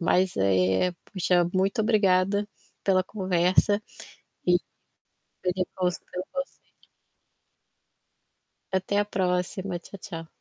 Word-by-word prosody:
mas, 180 +2 +2
eh, 95 - +3 0.2
puxa, 180 -2 +3
muito 195 +4 +1
obrigada 205 -2 +3 0.4
pela 185 -1 +4
conversa 190 +1 +2 0.6
e 180 0 +5 0.9
pelo 185 0 0
con 180 -1 +1 0.2
pelo 180 +1 -4
conselho. 275 0 -6 2.0
Até 190 +2 0
a 205 - +2
próxima. 180 -1 -1
Tchau, 195 +3 -12
tchau. 165 -6 -7
185 Hz, 100 wpm, -27 LUFS, 180-200 Hz, 2.0 s, e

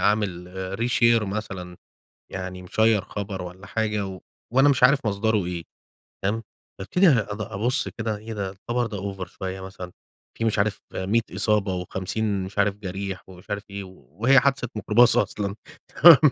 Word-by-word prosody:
عامل 100 -4 +1 0.3
reshare 115 -1 +4
مثلًا. 95 -3 -5 0.6
يعني 90 -1 -5
مشيّر 110 +3 +2
خبر 100 -2 -5
والّا 90 +3 -9
حاجة 105 -1 -1
و 95 -1 -7 0.3
وأنا 135 +3 +6
مش 135 -3 +2
عارف 140 +1 +5
مصدره 105 -1 +1
إيه، 85 -1 -4 0.6
تمام. 105 +4 0 0.4
بأبتدي 180 - +3
أد 105 -7 +1
أبُص 115 +6 0
كده، 110 -2 -3
إيه 110 +2 -8
ده 100 -2 -3
الخبر 120 +5 -2
ده 105 -2 -5
أوفر 95 -1 -4
شويّة 95 0 -6
مثلًا. 95 -1 -8 0.5
في 115 - -1
مش 110 -2 +1
عارف 100 0 +1 0.2
100 100 +5 +1
إصابة 105 0 +1
و50 95 +3 -2
مش 95 +2 -8
عارف 100 0 +3
جَرِيح 95 -1 -5
ومش 95 +2 -14
عارف 100 0 -2
إيه 100 0 -5
و 95 0 -15
وهي 135 +3 +6
حادثة 135 -1 +1
ميكروباص 110 +3 +5
أصلًا 100 -1 0 0.5
تمام 170 -2 +12
100 Hz, 160 wpm, -25 LUFS, 95-115 Hz, 0.6 s, تمام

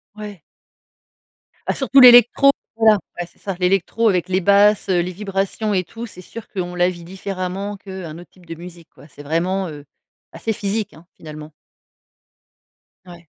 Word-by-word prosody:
Ouais. 210 -5 -9 1.3
Ah - - +1
surtout 270 0 +4
l'électro, 245 +2 +8 0.2
voilà, 220 -2 +4 0.2
ouais, 175 - -3
c'est - - -29
ça, 195 -3 -5
l'électro 195 +5 +1
avec 180 -2 0
les 185 0 0
basses, 200 +2 +4
heu, 180 -2 +3
les 180 +1 -2
vibrations 195 +2 -2
et 185 -2 0
tout. 230 +6 -8
C'est 200 - -13
sûr 220 +5 -10
qu'on 180 -3 -5
la 175 0 +2
vit 175 -2 -9
différemment 190 +2 -5
qu'un 190 -5 -8
autre 175 - -13
type 180 -2 -22
de 165 0 -7
musique, 170 0 -12
quoi. - - -17
C'est 145 0 -14
vraiment, 180 +5 -1
heu, 145 -2 -10 0.5
assez 225 - -3
physique, 205 0 -3
hein, 165 +2 -17
finalement. 155 0 -10 1.5
Ouais. 175 -1 -14
185 Hz, 165 wpm, -20 LUFS, 175-205 Hz, 1.5 s, l'électro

